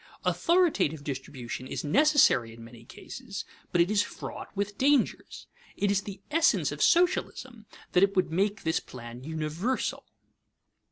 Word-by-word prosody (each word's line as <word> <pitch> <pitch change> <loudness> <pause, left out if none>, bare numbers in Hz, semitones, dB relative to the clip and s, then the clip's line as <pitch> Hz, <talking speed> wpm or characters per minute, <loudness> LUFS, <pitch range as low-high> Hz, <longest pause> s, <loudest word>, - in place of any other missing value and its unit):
Authoritative 295 - +2
distribution 130 -3 -6
is - - -4
necessary 150 - +4
in 115 - -12
many 115 0 -13
cases, 210 - -8 0.3
but 175 - +3
it 175 +4 +2
is 210 -1 +3
fraught 220 - -7
with 200 +1 -2
dangers. 275 +1 +1 0.3
It 200 -1 +1
is 200 -1 +1
the 195 -1 -9
essence 330 +2 +3
of - - -6
socialism 260 -10 +1 0.2
that 180 - +3
it 200 +1 +3
would 185 -3 +1
make 200 +4 0
this 160 0 +1
plan 120 0 -10
universal. 160 - -2
195 Hz, 145 wpm, -28 LUFS, 145-240 Hz, 0.3 s, necessary